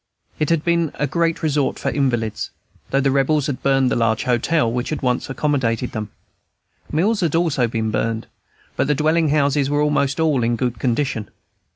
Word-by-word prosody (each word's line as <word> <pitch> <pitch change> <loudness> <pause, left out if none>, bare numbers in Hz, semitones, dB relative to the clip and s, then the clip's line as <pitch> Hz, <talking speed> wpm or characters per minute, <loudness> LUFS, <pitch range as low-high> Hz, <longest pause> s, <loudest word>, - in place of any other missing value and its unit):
It 150 - 0
had 165 -2 +2
been 170 -2 +1
a 145 - 0
great 165 +3 0
resort 150 -3 +1
for - - -2
invalids, 120 -6 -1 0.4
though 135 - +2
the 135 0 +2
Rebels 140 +1 +2
had 140 -3 -3
burned 135 -2 +2
the - - +1
large 115 -2 +1
hotel 125 +2 +1
which 125 +3 -2
once 125 0 -1
accommodated 130 -4 0
them. 110 -2 -4 0.8
Mills 200 +8 +1
had 165 -4 0
also 155 -7 +2
been 110 -1 -2
burned; 115 +1 -1 0.5
but - - 0
the 150 - +2
dwelling 155 +2 +2
houses 140 -1 +2
were 145 +1 +1
almost 145 -1 +1
all 155 -5 +2
in 120 +1 +1
good 120 -2 -2
condition. 120 -3 -1
140 Hz, 180 wpm, -21 LUFS, 120-155 Hz, 0.8 s, had